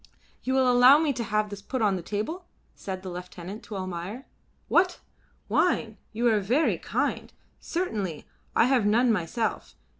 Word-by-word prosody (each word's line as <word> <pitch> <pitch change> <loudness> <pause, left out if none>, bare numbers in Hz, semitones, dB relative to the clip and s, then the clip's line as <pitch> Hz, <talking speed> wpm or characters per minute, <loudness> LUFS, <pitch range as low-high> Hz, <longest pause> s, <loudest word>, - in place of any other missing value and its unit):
"You 260 +1 -1
will 260 -1 +4
allow 250 +3 +7
me 305 -2 +1
to 235 - -3
have 210 0 -1
this 205 -1 -7
put 260 +5 -4
upon 205 -4 +2
the 180 - -4
table?" 215 - -4 0.3
said 190 -1 -6
the 190 - -5
lieutenant 180 +3 -8
to 210 - -7
Almayer. 185 +6 -5 0.4
"What! 360 0 +3 0.5
Wine! 225 - +1
You 235 +3 -2
are 215 - +3
very 245 +11 +1
kind. - - -2 0.3
Certainly, 205 - -3 0.3
I - - +5
have 250 -5 +3
none 235 +3 +4
myself. 210 +3 -2
220 Hz, 160 wpm, -27 LUFS, 195-260 Hz, 0.5 s, allow